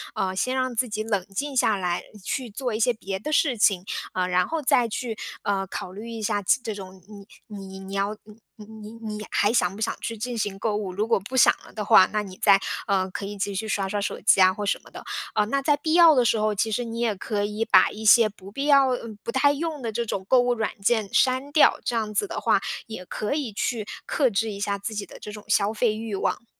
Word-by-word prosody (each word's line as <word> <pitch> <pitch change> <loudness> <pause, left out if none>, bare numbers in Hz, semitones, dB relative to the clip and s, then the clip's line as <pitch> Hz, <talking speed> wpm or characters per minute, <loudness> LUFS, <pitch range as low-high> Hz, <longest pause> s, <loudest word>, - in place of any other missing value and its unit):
呃， 190 -1 -1
先 255 +7 0
让 255 -1 -1
自 245 +1 0
己 215 0 -3
冷 205 -4 -1
静 285 +4 -3
下 220 -4 +3
来， 180 -3 -2 0.2
去 250 +4 -3
做 245 +2 -3
一 215 - -2
些 240 +2 +3
别 195 -3 -5
的 300 +10 -5
事 290 -4 +2
情， 195 -3 +3 0.3
呃， 185 -1 0
然 180 0 +2
后 325 - -2
再 250 -3 +3
去， 230 +1 -4 0.3
呃， 195 -1 -1
考 180 - -6
虑 210 +5 -8
一 230 -1 -6
下 205 -1 0
其 195 - +3
这 220 - -3
种 190 -2 -10
你 205 -1 -12 0.2
你 195 -3 -9
你 195 0 -9
要 200 +2 -1
你 210 -1 -14 0.2
你 215 -3 -12 0.3
你 225 -1 -7
你 210 - -7
还 205 +2 +2
想 185 -5 +1
不 - - -10
想 - - -1
去 230 - -4
进 245 +3 -4
行 205 -3 -2
购 210 +1 -1
物， 205 -3 -3
如 210 +4 -1
果 230 - +2
不 230 +7 -6
想 - - +7
了 - - -14
的 210 -2 -4
话， 210 -3 +7
那 210 0 -1
你 185 -2 -11
再， 200 -2 +6 0.3
呃， 190 -1 +1
可 195 - -5
以 205 0 -7
继 200 +1 -2
续 210 +3 -3
刷 200 -2 -1
刷 205 +1 -2
手 - - -3
机 195 - +5
啊 185 0 +7
或 205 +2 -5
什 200 - 0
么 - - -16
的。 - - -10 0.3
啊 210 - +3
那 275 +6 -1
在 290 +1 +2
必 315 +2 -1
要 335 -2 +7
的 250 -2 +3
时 225 -1 +2
候， 215 0 +1
其 220 +3 0
实 245 +3 -1
你 230 0 -6
也 235 -2 +1
可 205 +2 -2
以 210 +2 -2
把 - - +5
一 215 - -8
些 220 +1 +7
不 195 -2 -14
必 275 +6 -3
要 280 -2 +6
呃， 245 -2 -3
不 - - -3
太 275 +3 +4
用 300 -1 -4
的 230 - -2
这 235 +2 -2
种 190 -2 -3
购 255 - +5
物 245 0 +1
软 220 -2 -1
件 215 0 +1
删 260 +2 +2
掉， 300 - +5
这 240 - -1
样 215 -2 -2
子 205 - +2
的 - - -5
话， - - +3 0.3
也 220 -5 -8
可 210 +7 -3
以 275 -8 -3
去 220 +1 -2 0.2
克 265 -5 +2
制 220 +2 0
一 200 - -7
下 200 0 -2
自 220 +2 -5
己 205 -1 -3
的 - - -13
这 210 - -8
种 210 0 -10
消 210 -1 +2
费 220 0 +1
欲 220 -1 -4
望。 215 - -2
215 Hz, 285 characters per minute, -25 LUFS, 200-240 Hz, 0.3 s, 想